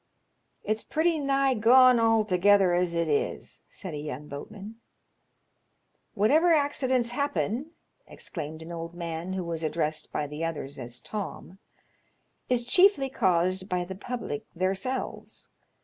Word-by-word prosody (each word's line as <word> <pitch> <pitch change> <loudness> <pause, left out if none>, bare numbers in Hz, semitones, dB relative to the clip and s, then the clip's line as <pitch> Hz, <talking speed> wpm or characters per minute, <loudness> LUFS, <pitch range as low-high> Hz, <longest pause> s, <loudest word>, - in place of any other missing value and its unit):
"It's 215 +1 -1
pretty 320 +1 +1
nigh 275 -1 +2
gone 250 +2 +6
altogether 205 -4 +4
as 175 -1 +1
it 170 -1 0
is," 145 -2 -2
said 185 -4 -7
a - - -4
young 150 -1 -6
boatman. 205 +10 -9 0.6
" - - -47
Whatever 305 - +4
accidents 260 -5 +1
happens," 280 -1 -1 0.4
exclaimed 155 +2 -7
an 165 - -9
old 165 0 -6
man 170 +1 -4
who 190 -1 -2
was 165 -1 -4
addressed 155 -1 -2
by 150 - -2
the 150 +2 -6
others 150 -4 -4
as 120 -1 -6
Tom, 195 - -7 0.9
"is 245 -1 +1
chiefly 295 0 +5
caused 185 -2 +1
by 180 -1 -1
the 190 - -6
public 210 - -5
theirs^lves. 190 +8 -3
190 Hz, 135 wpm, -27 LUFS, 165-250 Hz, 0.9 s, gone